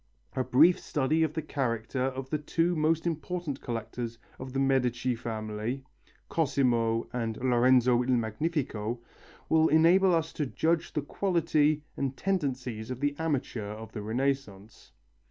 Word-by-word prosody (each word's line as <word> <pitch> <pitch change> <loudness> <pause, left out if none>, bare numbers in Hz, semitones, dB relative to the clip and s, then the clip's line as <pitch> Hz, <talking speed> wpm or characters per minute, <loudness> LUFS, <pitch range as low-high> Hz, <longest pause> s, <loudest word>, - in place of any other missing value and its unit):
A 130 - +1
brief 155 +9 +5
study 150 +2 0
of 155 -1 +1
the 160 - -2
character 125 -4 -2
of 130 0 -3
the 155 - 0
two 165 +4 0
most 160 +1 +1
important 170 -2 -3
collectors 115 0 -4 0.2
of 130 0 -7
the 135 - -2
Medici 130 -2 +1
family, 110 +2 -4 0.4
Cosimo 120 -7 +1
and 115 -3 -2
Lorenzo 125 0 +4
il 125 - -4
Magnifico, 115 -1 -2 0.5
will 160 0 +4
enable 175 +4 +5
us 160 0 -1
to 150 - -2
judge 165 +5 +1
of - - -19
the 150 - 0
quality 155 -4 +1
and 135 -1 -2
tendencies 130 - -2
of 125 -1 -4
the 145 +1 0
amateur 125 -9 -2
of 110 0 -9
the 110 - -5
Renaissance. 115 -3 -3
130 Hz, 145 wpm, -29 LUFS, 120-155 Hz, 0.5 s, brief